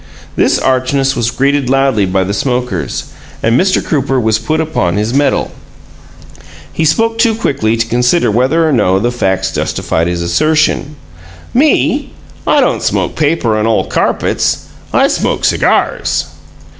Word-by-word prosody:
This - - +2
archness 135 +1 0
was 120 -2 0
greeted 135 +1 0
loudly 135 -7 +2
by 95 +1 +1
the 95 +2 -3
smokers, 125 - -2 0.4
and 115 - +2
Mr. 185 +9 +2
Crooper 135 -3 0
was 110 -2 +1
put 155 +8 -1
upon 105 - -1
his 105 +3 -1
mettle. 140 +1 +1 1.2
He 160 - 0
spoke 225 +8 +1
too 230 -2 +3
quickly 115 - -1
to 115 - 0
consider 125 +4 +1
whether 135 +9 +2
or 155 - +1
no 95 -6 +2
the 120 +5 0
facts 95 -5 -1
justified 80 +1 -1
his 85 -1 -2
assertion. 150 - +1 0.6
"Me? 290 +5 +1 0.3
I - - +4
don't - - 0
smoke - - -1
paper 150 -7 +1
and 110 +1 0
ole 115 - +1
carpets. - - -1 0.3
I - - +3
smoke - - -1
cigars!" - - +1
125 Hz, 145 wpm, -13 LUFS, 110-150 Hz, 1.2 s, I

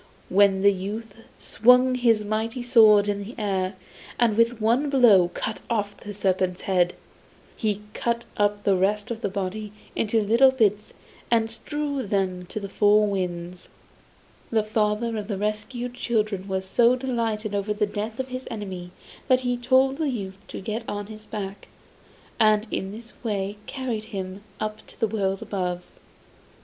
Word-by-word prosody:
Then 195 0 +4
the 200 0 +6
youth 205 +3 -5 0.2
swung 250 +3 +4
his 230 -4 +2
mighty 225 +4 -2
sword 220 -4 +6
in 205 0 -1
the 225 +5 -9
air, 195 -3 -1 0.4
and 235 -3 +3
with 230 +1 +2
one 235 +7 +2
blow 230 -10 +6
cut 220 - -3
off 205 -3 -1
the 205 - -8
serpent's 185 -2 0
head. 180 -2 +1 0.6
He 210 -2 -1
cut 235 0 -1
up 205 0 +1
the 195 - +3
rest 205 +5 0
of 230 -1 -4
the 200 - -1
body 200 +2 -4 0.2
into 225 +1 +1
little 230 +6 +6
bits 215 -5 +1 0.4
and 225 -1 +2
strewed 285 -1 -3
them 185 -3 -1
to 215 - -4
the 200 - -5
four 210 +1 +4
winds. 180 -3 -4 0.8
The 220 -2 +2
father 215 +1 0
of 210 -2 -4
the 205 -3 -2
rescued 215 +4 -3
children 215 -5 -1
was 190 -1 -2
so 235 +6 +4
delighted 230 -5 -2
over 200 +1 -1
the 210 0 +1
death 210 +3 -5
of 260 0 -3
his 255 +1 -6
enemy 190 -5 -6 0.4
that 255 -2 +4
he 245 -1 0
told 260 +2 +3
the 310 -2 0
youth 195 -6 -5
to - - -7
get 215 +4 -3
on 205 0 -3
his 215 0 -13
back, 195 -1 -6 0.7
and 215 -1 +4
in 190 - -2
this 230 +3 -11
way 200 -4 -1
he 205 - -10
carried 245 -5 -3
him 190 -2 -6 0.2
up 215 0 -4
to - - -13
the 225 - +2
world 195 -3 -1
above. 180 -3 -3
210 Hz, 165 wpm, -25 LUFS, 200-235 Hz, 0.8 s, the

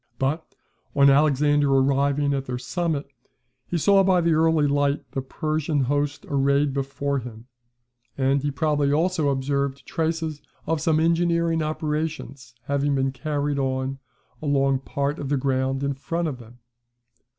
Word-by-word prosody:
But, 145 +6 -2 0.4
on 140 -1 +6
Alexander 145 0 +3
arriving 140 +1 +2
at 135 -1 -2
their 125 -1 -3
summit, 150 +3 -2 0.6
he 175 - -1
saw 195 +4 +4
by 185 -1 +3
the 170 -1 +2
early 160 -1 +3
light 145 0 +1
the 135 - -2
Persian 155 +2 -1
host 145 +2 -1
arrayed 140 0 +2
before 140 +1 -2
him; 115 -2 -10 0.7
and 135 +1 +2
he 145 - -1
probably 145 -1 +1
also 160 0 +1
observed 140 0 -1
traces 160 -2 -2 0.2
of 160 -1 -1
some 160 -3 +2
engineering 170 0 +2
operation 155 -1 -2 0.3
having 140 +1 0
been 135 0 +1
carried 145 +1 -2
on 130 0 -2 0.4
along 135 -2 +2
part 140 +2 -3
of 140 - -4
the 145 - +1
ground 135 0 0
in 140 0 0
front 165 +5 -3
of 135 -5 -5
them. 120 +1 -14
145 Hz, 145 wpm, -24 LUFS, 135-155 Hz, 0.7 s, on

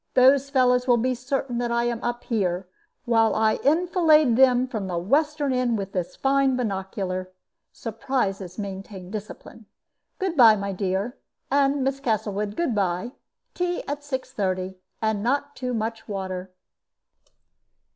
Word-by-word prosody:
Those 270 +2 +5
fellows 250 -2 +3
will 245 -1 +5
be 255 +2 +1
certain 255 -1 -2
that 240 -1 -1
I 235 0 +1
am 240 -1 -2
up 240 0 -2
here, 185 -5 -1 0.4
while 225 -2 +3
I 220 0 +2
enfilade 315 -4 +4
them 255 0 +5
from 215 -6 -4
the 175 -2 -2
western 285 - +1
end 250 -3 +1
with 195 -1 -4
this 180 -3 -3
fine 270 -1 +2
binocular. 190 -4 -3 0.4
Surprises 205 -5 -3
maintain 195 -2 -7
discipline. 215 +1 -8 0.5
Good 375 -3 -2
by, 230 -6 +8
my 200 -1 -3
dear, 195 +5 -2 0.3
and, 275 0 +3
Miss 270 +1 -1
Castlewood, 210 -4 -1
good 340 -8 0
by. 195 +3 -1 0.4
Tea 355 -1 -2
at 285 +1 -2
6.30, 195 -9 -3 0.3
and 220 -2 +1
not 285 +5 -1
too 250 -1 -3
much 225 -1 -3
water." 190 -2 -4
235 Hz, 140 wpm, -25 LUFS, 200-270 Hz, 0.5 s, by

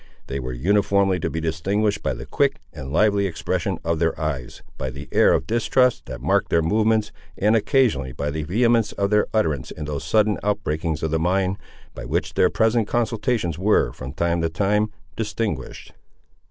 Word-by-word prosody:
They 70 - -4
were 65 -1 -4
uniformly 95 +6 +2
to - - -2
be 80 - -3
distinguished 95 +7 0
by 65 - -1
the - - -8
quick - - +1 0.2
and 65 0 -7
lively 100 +2 +3
expression 85 -4 -2
of 85 -1 0
their 80 -1 0
eyes, 70 -6 -4
by 65 - -4
the 70 +3 -8
air - - +5
of - - +1
distrust 125 +2 +1
that - - -7
marked - - +1
their 80 - +2
movements, 110 +4 +2 0.3
and 105 +3 +3
occasionally 110 - +2
by 70 +4 -3
the 80 +1 -3
vehemence 115 +6 +2
of 100 0 -1
their 105 0 +3
utterance 80 - 0
in 75 - -7
those 75 -1 -4
sudden 105 -1 +2
outbreakings 80 -6 -1
of 80 - -1
the 80 - +1
mind, 95 +3 +1 0.4
by - - -8
which - - -2
their - - +4
present 110 -1 +2
consultations 115 - -1
were, 105 +3 +2
from 65 +1 -7
time 85 +3 0
to 80 - 0
time, 105 +5 +1 0.3
distinguished. 105 - -4
95 Hz, 180 wpm, -23 LUFS, 80-110 Hz, 0.4 s, air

